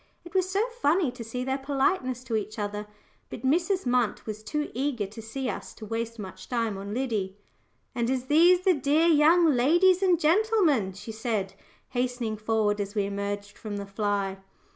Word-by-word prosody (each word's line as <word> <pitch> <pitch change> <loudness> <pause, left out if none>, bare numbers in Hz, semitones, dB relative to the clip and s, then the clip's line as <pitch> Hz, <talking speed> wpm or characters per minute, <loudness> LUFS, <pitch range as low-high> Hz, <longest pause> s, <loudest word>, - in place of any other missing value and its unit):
It 345 - -11
was 370 -1 +1
so 400 +4 +1 0.2
funny 310 -1 +3
to 245 -1 -8
see 250 +3 -4
their 265 +1 -1
politeness 270 -2 0
to 235 -3 -3
each 215 0 -3
other. 210 0 -4 0.4
But - - -8
Mrs. 350 +7 +1
Munt 245 -4 +1
was 215 -1 -5
too 295 +7 -3
eager 255 -4 -1
to 215 +3 -9
see 250 +4 -4
us - - -5
to 220 - -9
waste 230 +1 -3
much 195 -3 -9
time 230 -4 0
on 200 +1 -6
Liddy. 210 -6 -2 0.6
"And 235 -1 -1
is 260 -1 -1
these 345 +6 +5
the 370 0 +4
dear 295 +2 +2
young 325 0 +5
ladies 345 +9 +4
and 365 -4 +3
gentleman?" 330 - +3
she 200 +4 -8
said, 220 -3 -2 0.4
hastening 245 -3 -2
forward 215 -1 +1
as 200 +1 -5
we 205 -2 +1
emerged 200 0 -4
from 210 -2 -5
the 200 - -5
fly. 200 -1 -2
245 Hz, 185 wpm, -27 LUFS, 210-300 Hz, 0.6 s, these